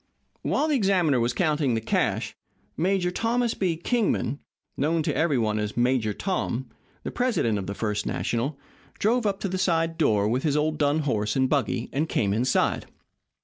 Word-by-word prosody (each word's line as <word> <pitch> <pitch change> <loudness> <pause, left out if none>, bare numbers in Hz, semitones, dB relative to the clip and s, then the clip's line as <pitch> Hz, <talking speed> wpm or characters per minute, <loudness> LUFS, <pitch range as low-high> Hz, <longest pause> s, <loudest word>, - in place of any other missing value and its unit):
While 310 - +1
the 305 - +2
examiner 185 - +2
was 120 +1 +1
counting 150 -2 +1
the - - +1
cash, 110 - -1 0.4
Major 180 +1 +1
Thomas 235 +4 0
B. 175 -4 -1
Kingman 200 - 0 0.4
known 155 +3 +1
to - - -1
every 160 -4 +2
one 110 -2 0
as 105 +1 -3
"Major 120 -3 +2
Tom" 130 - -2 0.4
the - - -4
president 220 - +1
of 95 - -5
the 100 - -4
First 105 -1 -2
National, 130 +5 -1 0.4
drove 230 +1 +2
up 195 -1 -1
to - - -1
the 185 0 -3
side 165 -2 +1
door 105 -9 +3
with 125 +4 0
his 150 -1 +1
old 155 0 0
dun 145 +1 +2
horse 105 -7 -1
and 130 0 +3
buggy, 130 -4 0
and 150 +3 0
came 100 -3 +1
inside. 125 +4 +1
150 Hz, 180 wpm, -26 LUFS, 115-180 Hz, 0.4 s, door